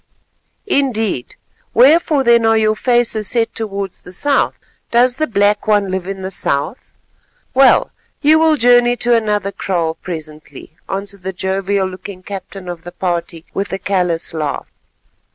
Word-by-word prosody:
"Indeed. 225 - -1 0.4
Wherefore 290 +3 +5
then 235 -1 +4
are 225 0 +4
your 215 0 +2
faces 235 -3 +1
set 230 -2 +1
towards 200 -4 -5
the 180 - -12
south? 280 +9 +1 0.3
Does 245 +2 +3
the 310 - 0
Black 205 -1 +1
One 205 -3 +2
live 190 -1 -3
in 195 -1 -5
the 190 - -4
south? 145 - -2 0.6
Well, 265 0 +5 0.3
you 310 +2 +4
will 320 -1 +4
journey 245 -2 +4
to 240 0 +2
another 210 -3 0
kraal 170 -5 -1
presently," 155 -2 -9
answered 195 0 -5
the 190 +1 -4
jovial 190 +1 -1
looking 185 0 -9
captain 195 -1 -8
of 175 -2 -7
the 175 - -8
party 170 -2 -3
with 200 +1 -3
a - - 0
callous 180 -4 -1
laugh. 155 -3 -4
200 Hz, 150 wpm, -17 LUFS, 185-240 Hz, 0.6 s, Wherefore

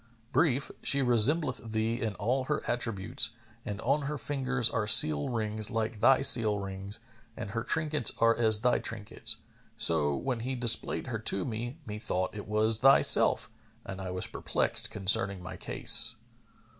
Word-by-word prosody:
Brief, 140 -4 0
she 140 -1 +3
resembleth 130 +4 +3
thee 110 +3 -2
in 110 -4 -4
all 130 +5 -2
her - - -3
attributes, 115 -5 -1 0.3
and 105 0 -7
on 140 +3 -1
her 150 - -4
fingers 130 -1 -2
are 110 -3 -3
seal 75 -8 +6
rings 110 -3 -2
like 110 -2 -4
thy 135 +5 +3
seal 110 -6 +3
rings 100 +1 -8 0.4
and 110 -2 -7
her 115 +1 -4
trinkets 150 -3 +1
are 115 0 +2
as 110 -2 +2
thy 125 0 +1
trinkets. 110 -3 -3 0.4
So, 75 -4 +1
when 130 - -4
he 130 +3 -5
displayed 120 -2 +1
her 115 -4 -5
to 100 -3 -1
me, 120 +4 -6
methought 105 -4 -4
it 105 -1 -9
was 110 +1 +1
thyself 135 +2 +4 0.3
and 95 0 -8
I 95 - -6
was 90 0 -2
perplexed - - -2
concerning 100 -1 0
my 95 - -9
case. - - +3
115 Hz, 155 wpm, -28 LUFS, 105-125 Hz, 0.4 s, seal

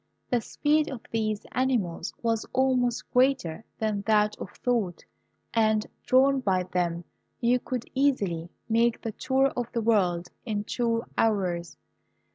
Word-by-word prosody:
The 245 -2 +2
speed 300 +6 +1
of 255 -5 -6
these 215 -2 -1
animals 230 -10 0
was 225 -1 +1
almost 255 -2 +1
greater 250 -9 +2
than 215 -2 -1
that 210 -1 +3
of - - -7
thought; 220 -9 -1 0.5
and, 215 -1 +3 0.2
drawn 270 +1 +5
by 190 -7 +1
them, 175 -1 -1 0.4
you 245 +1 +3
could 250 -1 -4
easily 200 -12 +1 0.2
make 230 +1 +2
the 225 - -2
tour 265 +5 +2
of 245 -1 -3
the 235 - 0
world 180 -6 +2
in 210 -3 -2
two 230 +1 0 0.2
hours. 180 -6 0
225 Hz, 135 wpm, -27 LUFS, 200-250 Hz, 0.5 s, drawn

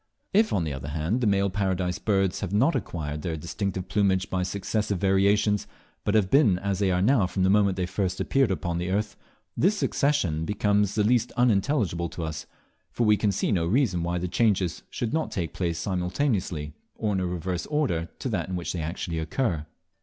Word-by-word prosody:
If, 215 +2 +4
on 90 - +1
the 75 -3 -3
other 65 +1 -6
hand, 80 - -1
the 115 - +2
male 100 -1 +2
Paradise 90 -2 -1
Birds 95 -2 +1
have 95 -3 -4
not 125 +11 +3
acquired 75 -3 -3
their 80 -2 -3
distinctive 95 +3 -3
plumage 95 -2 +1
by 95 - 0
successive 100 +2 -1
variations, 100 +2 +2 0.4
but 105 - 0
have 100 -4 +2
been 125 -11 +5
as 100 0 -2
they 100 -2 +2
are 90 0 +1
mow 110 -4 +4
from 95 +1 -1
the 95 - +4
moment 100 -2 +3
they 90 - 0
first 95 0 -2
appeared 135 -4 +2
upon 85 -1 -2
the 90 +1 -2
earth, 105 +2 -1 0.4
this 200 +5 +2
succession 140 - +1
becomes 105 +2 +1
at 105 - +4
the - - +2
least 120 0 +2
unintelligible 100 - +1
to 85 - -6
us, 80 0 -5 0.4
for 120 - -1
we 105 0 +5
can 105 0 +1
see 95 - -1
no 85 -5 +1
reason 100 -4 +2
why 85 +1 -1
the 90 +1 -2
changes 95 -3 +1
should 120 +1 -3
not 160 0 0
take 85 -4 -3
place 85 -3 -2
simultaneously, 90 - -1 0.2
or 105 -2 -1
in 95 - 0
a 90 - -1
reverse 90 0 -3
order 90 - 0
to - - -4
that 95 -8 -2
in 95 - -2
which 90 - -3
they 85 - -3
actually 85 +1 -3
occur. 80 - -1
95 Hz, 205 wpm, -26 LUFS, 85-105 Hz, 0.4 s, been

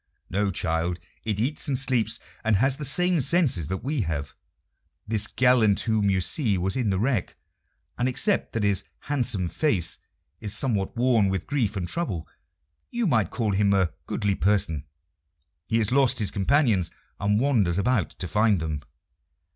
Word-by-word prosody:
"No, 100 +2 +1
child; 85 -1 -1 0.3
it 105 -2 -1
eats 135 +7 -1
and 135 -3 0
sleeps, 120 -4 +1 0.2
and 110 -2 +2
has 135 +6 +2
the 150 - -3
same 180 +3 +2
senses 135 - +2
that 95 +2 -4
we 140 0 -1
have. 75 -6 -3 0.7
This 110 -1 +1
gallant 120 -6 +3
whom 110 -3 +1
you 95 -1 +2
see 110 - 0
was 95 +2 -1
in 125 -5 0
the 95 - +1
wreck, 115 -1 -1 0.6
and 125 +1 +2
except 200 +10 +1
that 115 - -1
his 100 -1 +1 0.2
handsome 120 -10 -1
face 95 - 0 0.4
is 105 -2 -4
somewhat 105 -6 -1
worn 120 -5 +3
with 95 -2 -2
grief 120 -8 -1
and 90 -3 -3
trouble, 90 - -3 0.6
you 240 -1 -1
might 110 - +2
call 110 -4 -1
him 100 0 +2
a 95 -4 +1
goodly 100 -1 0
person. 95 -7 0 0.8
He 115 - +1
has 110 -1 +1
lost 130 -1 +4
his 105 -4 +1
companions, 105 - +2 0.3
and 105 +2 +1
wanders 110 -10 +2
about 105 +1 +1
to 90 - -6
find 105 +2 +2
them." 80 -2 -3
105 Hz, 165 wpm, -25 LUFS, 95-130 Hz, 0.8 s, lost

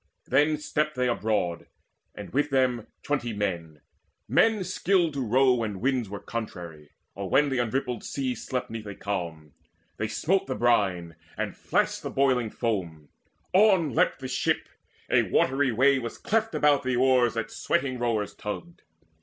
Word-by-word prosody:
Then 150 +2 +3
stepped 150 0 -1
they 125 0 +1
aboard, 105 -7 -1 0.5
and - - -8
with 145 +2 +1
them 130 -4 +1 0.2
twenty 130 -6 -1
men, 85 -7 -3 0.5
Men 220 -3 +3
skilled 185 -2 +1
to 140 -2 -2
row 130 +3 +4
when 110 -5 -2
winds 125 -3 0
were 100 0 -6
contrary, 85 -10 -7 0.2
Or 100 -1 -5
when 145 +7 +4
the 135 -2 -1
unrippled 120 0 -2
sea 130 -2 -2
slept 125 +1 -4
'neath 110 -2 -6
a 100 - -6
calm. 85 -8 -5 0.4
They 110 - -1
smote 180 - 0
the 130 - -2
brine, 95 -9 +1 0.2
and - - -3
flashed - - 0
the - - -4
boiling 130 -4 +2
foam: 90 - -3 0.4
On 190 - +4
leapt - - +2
the 130 - -4
ship; 130 - -1 0.4
a - - +4
watery 135 0 +2
way 135 +4 +4
was 120 -2 -6
cleft 225 +1 0
About 145 -1 +4
the 130 -2 -1
oars 125 -2 +3
that 115 -1 -3
sweating 135 -7 -1
rowers 110 -4 -1
tugged. 105 - -7
125 Hz, 160 wpm, -27 LUFS, 105-140 Hz, 0.5 s, row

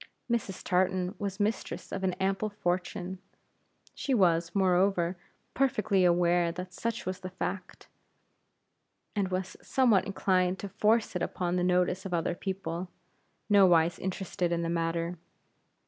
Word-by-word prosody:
Mrs. 210 -5 -2
Tartan 185 0 +1
was 200 -1 -3
mistress 210 0 -2
of 195 - -4
an 185 -1 +1
ample 195 +3 -1
fortune. 180 -1 -3 0.7
She 270 - -1
was, 170 -5 +3
moreover, 185 -1 +2 0.4
perfectly 215 -8 +2
aware 175 0 +3
that 180 +2 -7
such 230 +3 -3
was 185 0 -3
the 185 -1 -6
fact, 185 0 -5 1.3
and 200 -2 +1
was 185 0 -3
somewhat 230 -8 +3
inclined 185 -2 +1
to 200 - -6
force 220 +3 +2
it - - -1
upon 175 -1 -1
the 180 - +1
notice 180 +1 +2
of 185 -3 -2
other 165 +1 0
people, 185 -1 -4 0.6
nowise 175 -5 +5
interested 180 -2 -2
in 170 0 0
the 165 - -1
matter. 170 0 -1
185 Hz, 135 wpm, -29 LUFS, 175-195 Hz, 1.3 s, nowise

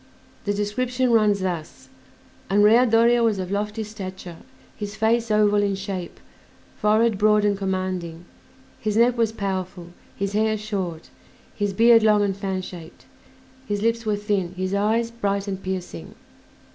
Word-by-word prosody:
The 205 - 0
description 245 +5 -1
runs 210 -3 +3
thus: 175 -4 -5 0.6
"Andrea 210 +5 +5
Doria 235 +1 +4
was 225 -3 +2
of 185 0 -4
lofty 210 +2 -2
stature, 190 -5 -8 0.4
his 205 -1 -6
face 225 +2 +1
oval 210 -1 +3
in 200 -1 0
shape, 190 -2 -6 0.6
forehead 215 0 +2
broad 210 0 +4
and 205 -1 +2
commanding, 185 -3 -3 0.5
his 215 -1 -1
neck 240 +1 +4
was 230 -2 +1
powerful, 185 -4 -4 0.3
his 200 0 -3
hair 215 +1 +1
short, 190 -6 -5 0.4
his 205 -1 -1
beard 230 +3 +5
long 210 -1 +4
and 195 -2 0
fan 190 -2 -3
shaped, 170 -3 -11 0.6
his 205 -1 -2
lips 230 0 +1
were 215 -2 0
thin, 200 -4 -2
his 185 +1 -3
eyes 220 +3 +1
bright 200 -3 -2
and 195 -1 -4
piercing." 180 - -6
205 Hz, 145 wpm, -23 LUFS, 190-220 Hz, 0.6 s, Andrea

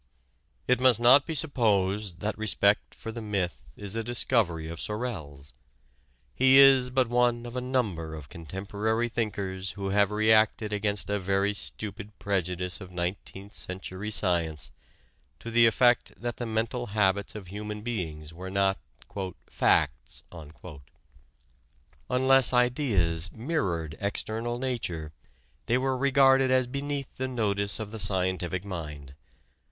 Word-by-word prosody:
It 125 0 +2
must 130 -3 +5
not 130 +4 +6
be 160 - -2
supposed 105 - +1
that 105 0 -1
respect 105 -1 +1
for 115 - -7
the 115 +1 -7
myth 100 -5 -3
is 100 0 -6
a 115 - -1
discovery 110 -8 +1
of 85 0 -7
Sorel's. 80 - -5 0.8
He 130 +1 +5
is 135 -2 +7
but 130 -1 +1
one 120 0 +1
of 120 +1 -8
a 125 - -1
number 105 -12 -2
of 75 -3 -9
contemporary 100 +8 -3
thinkers 100 -4 -3
who 100 -1 -4
have 100 0 +3
reacted 110 0 +2
against 100 -2 0
a 105 - 0
very 100 +2 +1
stupid 105 +1 -5
prejudice 90 -2 -2
of 95 -1 -10
nineteenth 95 +3 -5
century 95 +2 -6
science 85 - 0 0.7
to 115 - -7
the 115 0 +6
effect 120 +2 +2
that 120 -1 -4
the 120 - -4
mental 115 +2 -2
habits 100 0 +1
of 100 -4 -8
human 105 +1 -6
beings 80 -9 -5
were 90 +3 -7
not 95 0 +1 0.7
"facts." 65 -1 0 1.9
Unless 130 0 +4
ideas 105 - +2
mirrored 95 - -2
external 110 +4 -3
nature 90 -12 -3 0.5
they 120 - +3
were 130 0 0
regarded 135 0 +4
as 130 -1 +3
beneath 140 +1 -4
the 130 - -2
notice 100 -5 -1
of 105 -2 -6
the 110 - -6
scientific 95 -2 -1
mind. 75 -7 -7
105 Hz, 135 wpm, -27 LUFS, 95-120 Hz, 1.9 s, is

